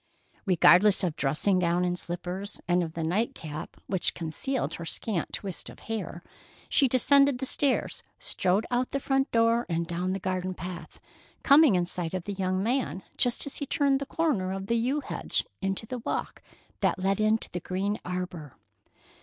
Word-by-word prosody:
Regardless 185 Hz, +3 st, +5 dB
of 170 Hz, -4 st, 0 dB
dressing 155 Hz, +7 st, +2 dB
gown 175 Hz, 0 st, +2 dB
and 180 Hz, 0 st, -1 dB
slippers, 180 Hz, +3 st, -5 dB
and 175 Hz, 0 st, +3 dB
of 165 Hz, -2 st, -4 dB
the 165 Hz, -, -3 dB
night 195 Hz, +9 st, 0 dB
cap 155 Hz, -1 st, -7 dB
which 190 Hz, -3 st, 0 dB
concealed 205 Hz, -, -2 dB
her 170 Hz, -, -6 dB
scant 170 Hz, +2 st, -2 dB
twist 195 Hz, -4 st, -5 dB
of -, -, -13 dB
hair, 205 Hz, -6 st, -5 dB, 0.5 s
she 275 Hz, -, +4 dB
descended 275 Hz, +2 st, +4 dB
the 265 Hz, -, -3 dB
stairs, 275 Hz, 0 st, +1 dB, 0.2 s
strode 190 Hz, +4 st, 0 dB
out 245 Hz, +1 st, +1 dB
the 275 Hz, -, -2 dB
front 270 Hz, 0 st, +1 dB
door 230 Hz, +1 st, +3 dB
and 170 Hz, 0 st, 0 dB
down 175 Hz, +2 st, -2 dB
the 195 Hz, -, -2 dB
garden 185 Hz, -1 st, -2 dB
path, 175 Hz, +1 st, -8 dB, 0.4 s
coming 280 Hz, -6 st, +7 dB
in 175 Hz, -1 st, +2 dB
sight 175 Hz, 0 st, -3 dB
of 185 Hz, -, -4 dB
the 205 Hz, -, -3 dB
young 185 Hz, 0 st, -1 dB
man 230 Hz, -, -1 dB
just 245 Hz, -1 st, 0 dB
as 285 Hz, -, -2 dB
he 285 Hz, -, -3 dB
turned 280 Hz, -3 st, +2 dB
the 280 Hz, -, -5 dB
corner 280 Hz, -, 0 dB
of 195 Hz, 0 st, -4 dB
the 230 Hz, -, 0 dB
yew 255 Hz, +6 st, +1 dB
hedge -, -, -2 dB, 0.2 s
into 195 Hz, +2 st, -2 dB
the 250 Hz, +2 st, -5 dB
walk -, -, -4 dB, 0.4 s
that -, -, +1 dB
led 195 Hz, +2 st, 0 dB
into 215 Hz, +1 st, +1 dB
the 175 Hz, -, -3 dB
green 195 Hz, +4 st, -2 dB
arbor. 180 Hz, -5 st, -5 dB
190 Hz, 180 wpm, -28 LUFS, 175-240 Hz, 0.5 s, coming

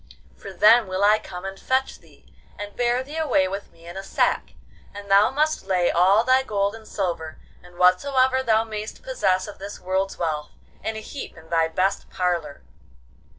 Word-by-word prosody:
for 195 Hz, -, -10 dB
then 210 Hz, +4 st, +5 dB
will 185 Hz, +1 st, -2 dB
I 210 Hz, +1 st, +5 dB
come 180 Hz, +1 st, -9 dB
and 195 Hz, 0 st, -6 dB
fetch 260 Hz, +1 st, -1 dB
thee, -, -, -23 dB, 0.2 s
and 205 Hz, 0 st, -7 dB
bear 245 Hz, +1 st, +1 dB
thee 295 Hz, +4 st, -8 dB
away 285 Hz, -12 st, +2 dB
with 195 Hz, +2 st, -6 dB
me 165 Hz, -, -20 dB
in 175 Hz, +1 st, -9 dB
a 195 Hz, -, -4 dB
sack, 195 Hz, -, -1 dB, 0.4 s
and 200 Hz, -1 st, -8 dB
thou 200 Hz, +2 st, +6 dB
must 305 Hz, -3 st, -1 dB
lay 180 Hz, -2 st, +2 dB
all 190 Hz, +6 st, +4 dB
thy 255 Hz, +2 st, +4 dB
gold 200 Hz, -5 st, -1 dB
and 225 Hz, -1 st, -12 dB
silver, 170 Hz, -5 st, -3 dB, 0.2 s
and 175 Hz, 0 st, -17 dB
whatsoever 260 Hz, +9 st, +3 dB
thou 225 Hz, -3 st, +2 dB
may'st 215 Hz, -, -7 dB
possess 200 Hz, -, 0 dB
of 205 Hz, -, -10 dB
this 200 Hz, +1 st, -8 dB
world's 190 Hz, +1 st, -2 dB
wealth, 155 Hz, -3 st, -3 dB, 0.3 s
in 220 Hz, -, -3 dB
a 220 Hz, -, -5 dB
heap 275 Hz, -1 st, -8 dB
in 160 Hz, +1 st, -16 dB
thy 165 Hz, -1 st, +3 dB
best 185 Hz, +4 st, -1 dB
parlour. 170 Hz, -, -2 dB
200 Hz, 190 wpm, -23 LUFS, 180-225 Hz, 0.4 s, thou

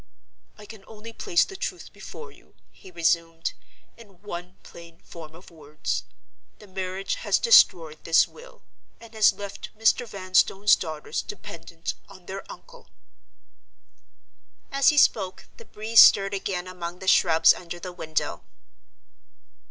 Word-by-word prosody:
"I 210 Hz, -, -13 dB
can 210 Hz, -1 st, -13 dB
only 225 Hz, +1 st, -11 dB
place 350 Hz, -, +1 dB
the 385 Hz, -, -11 dB
truth -, -, -6 dB
before 465 Hz, -1 st, -11 dB
you," -, -, -23 dB, 0.2 s
he -, -, -16 dB
resumed, 165 Hz, -1 st, -1 dB, 0.4 s
"in 200 Hz, -6 st, -18 dB
one 180 Hz, -2 st, -8 dB
plain 170 Hz, 0 st, -14 dB
form 160 Hz, -2 st, -12 dB
of 175 Hz, +2 st, -16 dB
words. 155 Hz, -2 st, -5 dB, 0.5 s
The 210 Hz, -, -15 dB
marriage 190 Hz, -, -4 dB
has -, -, +2 dB
destroyed 170 Hz, -, +4 dB
this 165 Hz, -, +4 dB
will, -, -, -16 dB, 0.4 s
and 230 Hz, 0 st, -15 dB
has 215 Hz, -1 st, +5 dB
left 200 Hz, -1 st, -9 dB
Mr. 225 Hz, +2 st, +2 dB
Vanstone's 195 Hz, +1 st, +2 dB
daughters 155 Hz, -3 st, -5 dB
dependent 170 Hz, -4 st, -8 dB, 0.2 s
on 185 Hz, -3 st, -16 dB
their 195 Hz, +2 st, -8 dB
uncle." -, -, -15 dB, 1.8 s
As 275 Hz, -1 st, +4 dB
he 300 Hz, -, 0 dB
spoke, 190 Hz, -9 st, +2 dB
the 465 Hz, -, -14 dB
breeze 220 Hz, -, +4 dB
stirred 195 Hz, 0 st, +6 dB
again 190 Hz, -2 st, -3 dB
among 180 Hz, -1 st, -7 dB
the 190 Hz, -, -10 dB
shrubs 165 Hz, -3 st, +5 dB
under 175 Hz, 0 st, -9 dB
the 180 Hz, +1 st, -8 dB
window. 160 Hz, -3 st, -3 dB
190 Hz, 135 wpm, -25 LUFS, 170-220 Hz, 1.8 s, stirred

